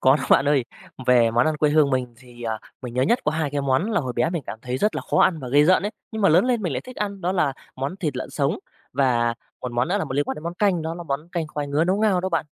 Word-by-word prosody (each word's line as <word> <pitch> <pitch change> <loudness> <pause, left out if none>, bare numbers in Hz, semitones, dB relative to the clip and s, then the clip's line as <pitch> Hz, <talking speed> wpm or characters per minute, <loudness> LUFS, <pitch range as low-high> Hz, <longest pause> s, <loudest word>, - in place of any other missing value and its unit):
Có 130 +2 +5
đó - - -5
bạn 135 - +6
ơi, 140 -5 +3 0.4
về 120 -2 +5
món 120 +2 +3
ăn 155 -1 +1
quê 150 0 +2
hương 150 -2 +4
mình 125 -2 -1
thì, 120 -1 -14
ờ, 110 -1 -2 0.2
mình 120 -1 -6
nhớ 125 - +2
nhất 235 - +3
có 150 - +2
2 155 -2 -1
cái 145 0 -1
món 140 +10 +1
là 205 - +2
hồi 130 -4 -4
bé 120 +7 +1
mình 170 -4 -3
cảm - - -6
thấy 125 0 -3
rất 210 +6 +1
là - - -3
khó - - +2
ăn 170 - +3
và 130 -4 -6
ghê 145 +4 +5
rợn 185 +3 +4
ấy, 205 - -1 0.2
nhưng 220 -1 -3
mà - - +6
lớn 170 +6 +5
lên 245 -3 +1
mình 175 -7 -1
lại 125 - -2
thích 255 - -12
ăn, 200 -2 -3
đó 180 +2 0
là 155 -7 +1 0.2
món 135 +7 -3
thịt 155 -9 -3
lợn 130 - -5
sống 145 +5 0 0.3
và 120 -3 +2 0.3
một 125 - -5
món 120 +3 0
nữa 195 +3 +1
là 195 - -1
liên 140 +2 +1
quan - - -3
đến 150 - -9
món 170 +1 -3
canh, 185 -3 +1
đó 160 +1 -3
là 175 - -7
món 150 +1 -4
canh 170 -3 -1
khoai 150 -1 -4
ngứa 145 +3 +1
nấu 185 +3 +1
ngao 210 -4 +3
đó 185 - -1
bạn. 165 -4 -1
150 Hz, 320 wpm, -23 LUFS, 130-180 Hz, 0.4 s, bạn